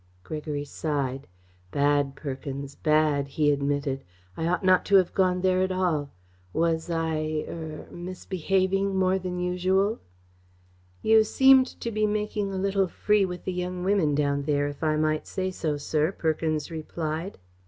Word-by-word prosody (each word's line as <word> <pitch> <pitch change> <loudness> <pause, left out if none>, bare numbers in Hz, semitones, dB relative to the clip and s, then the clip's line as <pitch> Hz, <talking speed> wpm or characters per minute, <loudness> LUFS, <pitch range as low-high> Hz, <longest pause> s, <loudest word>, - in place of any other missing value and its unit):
Gregory 150 - -4
sighed. 140 -3 -3 0.4
"Bad, 145 +2 +1
Perkins 140 0 -6
bad!" 150 -2 +2
he 145 +1 +2
admitted. 140 -1 -1 0.3
"I 165 - -2
ought 180 +1 0
not 185 -1 +5
to 200 - +3
have 185 -2 +4
gone 180 -1 +2
there 185 0 +2
at 185 0 +1
all. 170 -6 0 0.4
Was 165 0 0
I 155 -2 -1
er 160 -2 -7
misbehaving 190 +2 -1
more 190 0 +2
than 180 -1 -4
usual?" 185 +4 +1 1.0
"You 220 0 +6
seemed 265 +3 +6
to 235 - -2
be 215 0 +1
making 210 -1 -1
a 190 - -3
little 195 0 +1
free 210 +2 +2
with 180 -1 -7
the 185 - -2
young 180 0 -3
women 185 -7 +2
down 140 -1 +1
there, 145 0 0
if 145 +2 -7
I 155 -1 +2
might 155 0 0
say 185 -1 -2
so, 155 -5 -2
sir," 155 +3 0
Perkins 155 -3 -1
replied. 160 +2 -4
165 Hz, 155 wpm, -26 LUFS, 150-190 Hz, 1.0 s, You